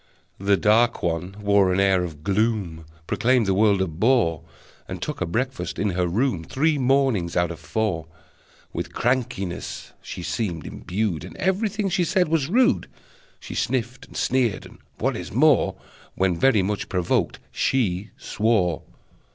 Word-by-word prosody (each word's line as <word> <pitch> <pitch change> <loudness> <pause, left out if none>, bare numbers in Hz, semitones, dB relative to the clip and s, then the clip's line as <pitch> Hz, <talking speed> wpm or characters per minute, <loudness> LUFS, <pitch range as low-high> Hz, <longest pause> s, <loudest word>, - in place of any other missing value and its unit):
The 100 0 +3
dark 115 +4 +3
one 85 +3 -2
wore 100 -2 +3
an 90 - +1
air 95 -2 +3
of 75 -4 -7
gloom, 100 -5 0 0.2
Proclaimed 125 +5 +2
the 95 - +2
world 100 -1 +3
a - - -2
bore, 85 0 +2 0.5
And - - -6
took - - -4
her - - -1
breakfast 130 +9 -2
in 100 -1 0
her 90 0 0
room 105 -1 0
Three 150 - +1
mornings 130 -10 +2
out 85 -1 +2
of 85 - -8
four. 95 -8 -2 0.7
With 85 +1 -4
crankiness 115 -8 -2
she - - -7
seemed 90 -8 -3
imbued, 95 -4 -3
And 95 - -10
everything 200 +2 0
she 180 -1 +1
said 180 0 +1
was 155 -3 +1
rude: 250 +6 +3 0.5
She - - -8
sniffed, 125 +1 -2
and - - -10
sneered, 125 -5 +1
and, - - -14 0.2
what - - 0
is - - -6
more, 140 +2 +4 0.4
When 95 -2 +1
very 105 +2 +3
much 100 +2 -2
provoked, 90 -2 0
she 105 -6 0
swore! 105 -7 0
105 Hz, 155 wpm, -24 LUFS, 90-130 Hz, 0.7 s, more